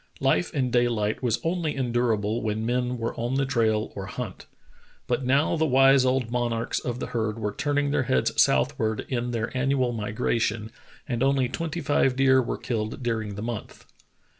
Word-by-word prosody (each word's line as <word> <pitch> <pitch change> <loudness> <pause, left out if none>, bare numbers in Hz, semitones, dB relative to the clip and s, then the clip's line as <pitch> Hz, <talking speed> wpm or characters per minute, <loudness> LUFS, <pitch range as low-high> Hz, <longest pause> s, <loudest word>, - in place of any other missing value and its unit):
Life 90 - +1
in 130 -4 -1
daylight 120 -4 +1
was 120 -4 0
only 165 -2 -1
endurable 120 -4 0
when 110 0 -2
men 125 +1 0
were 115 0 -3
on 120 +3 -1
the 135 0 +1
trail 110 -4 0
or 95 -1 -5
hunt. - - -6 0.6
But 125 +2 -1
now 135 +6 +2
the 160 -1 +1
wise 135 0 +5
old 130 -2 +1
mon 120 -1 0
archs 115 0 -1
of 125 0 -3
the - - -3
herds 110 -2 -1
were 105 -2 -3
turning 145 +2 0
their 145 - +2
heads 65 - +2
southward 110 +11 +1
in 125 -2 -1
their 115 +1 -3
annual 130 -1 +1
migration, 110 0 -1 0.4
and 120 -4 -2
only 135 -1 +3
twenty 165 +4 -3
five 135 -3 +2
deer 130 0 +4
were 120 - -3
killed 115 +1 -3
during 110 -4 -2
the 105 - -5
month. 115 -2 -6
120 Hz, 180 wpm, -26 LUFS, 110-135 Hz, 0.6 s, wise